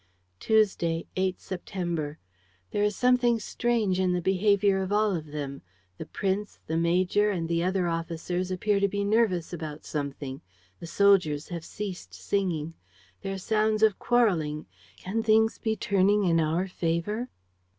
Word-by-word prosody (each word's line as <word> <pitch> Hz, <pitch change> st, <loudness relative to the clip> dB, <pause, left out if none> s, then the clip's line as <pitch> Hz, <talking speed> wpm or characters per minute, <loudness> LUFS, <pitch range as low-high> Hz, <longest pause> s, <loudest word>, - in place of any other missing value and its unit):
"Tuesday, 190 Hz, -7 st, +2 dB
8 185 Hz, 0 st, 0 dB
September. 170 Hz, -5 st, -4 dB, 0.5 s
"There 205 Hz, -, 0 dB
is 210 Hz, 0 st, +1 dB
something 245 Hz, -2 st, +3 dB
strange 220 Hz, -4 st, 0 dB
in 185 Hz, -1 st, +2 dB
the 180 Hz, -, +1 dB
behavior 195 Hz, +1 st, +2 dB
of 190 Hz, +1 st, -3 dB
all 210 Hz, -1 st, +2 dB
of 155 Hz, -2 st, -5 dB
them. 145 Hz, -2 st, -5 dB, 0.4 s
The -, -, -6 dB
prince, 200 Hz, +1 st, -2 dB
the 160 Hz, -, -3 dB
major 180 Hz, +5 st, +2 dB
and 175 Hz, -5 st, -2 dB
the 170 Hz, 0 st, 0 dB
other 185 Hz, -1 st, +1 dB
officers 170 Hz, +2 st, -2 dB
appear 200 Hz, +2 st, +1 dB
to 200 Hz, -, +3 dB
be 200 Hz, +1 st, -2 dB
nervous 200 Hz, -5 st, +1 dB
about 155 Hz, -2 st, -6 dB
something. 140 Hz, -2 st, -4 dB, 0.4 s
The 170 Hz, -, -8 dB
soldiers 180 Hz, -6 st, +3 dB
have 170 Hz, -2 st, -5 dB
ceased 195 Hz, 0 st, -7 dB
singing. 170 Hz, -6 st, -2 dB, 0.5 s
There 195 Hz, 0 st, -3 dB
are -, -, -5 dB
sounds 215 Hz, +2 st, +1 dB
of 215 Hz, -3 st, +4 dB
quarreling. 170 Hz, -11 st, +1 dB, 0.3 s
Can 210 Hz, +5 st, -2 dB
things 220 Hz, 0 st, +3 dB
be 220 Hz, -1 st, 0 dB
turning 200 Hz, 0 st, +2 dB
in 170 Hz, -3 st, +3 dB
our 165 Hz, +4 st, 0 dB
favor?" 180 Hz, +7 st, -2 dB
185 Hz, 150 wpm, -27 LUFS, 165-210 Hz, 0.5 s, of